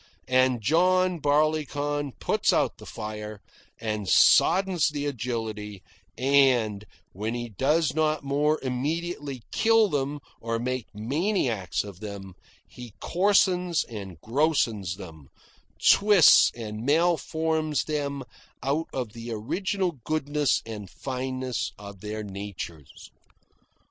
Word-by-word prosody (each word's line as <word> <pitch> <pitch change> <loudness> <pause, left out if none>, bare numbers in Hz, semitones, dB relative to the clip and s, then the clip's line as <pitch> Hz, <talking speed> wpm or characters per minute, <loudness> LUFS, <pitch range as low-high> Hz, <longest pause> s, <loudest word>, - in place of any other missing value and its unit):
And 130 -2 +3
John 180 - +3
Barleycorn 145 -1 0
puts - - +1
out - - +1
the - - -11
fire, 105 0 -6 0.4
and 105 -3 -3
soddens 190 -3 +5
the 145 -1 -4
agility, 110 -6 -4 0.3
and, 125 -6 +3 0.3
when 110 +5 -3
he 120 0 -4
does 140 - +1
not 155 -1 +1
more 145 +3 +1
immediately 140 0 -3
kill 225 -2 +4
them 145 -1 -2 0.2
or 115 0 -2
make 125 0 -3
maniacs 125 - -1
of 100 -3 -10
them, 100 -3 -8 0.3
he 120 -4 -11
coarsens 180 -2 +2
and 100 -7 -8
grossens 115 - 0
them, 80 -7 -11 0.5
twists 200 -5 +6
and 110 -2 -6
malforms 160 0 +1
them 140 -3 -2 0.4
out 145 +5 0
of 125 -5 -4
the 115 0 -7
original 170 - -2
goodness 150 -2 0
and 105 -4 -7
fineness 130 0 -4
of 100 -2 -11
their 105 +1 -5
natures. 95 -7 -8
130 Hz, 110 wpm, -26 LUFS, 110-155 Hz, 0.5 s, twists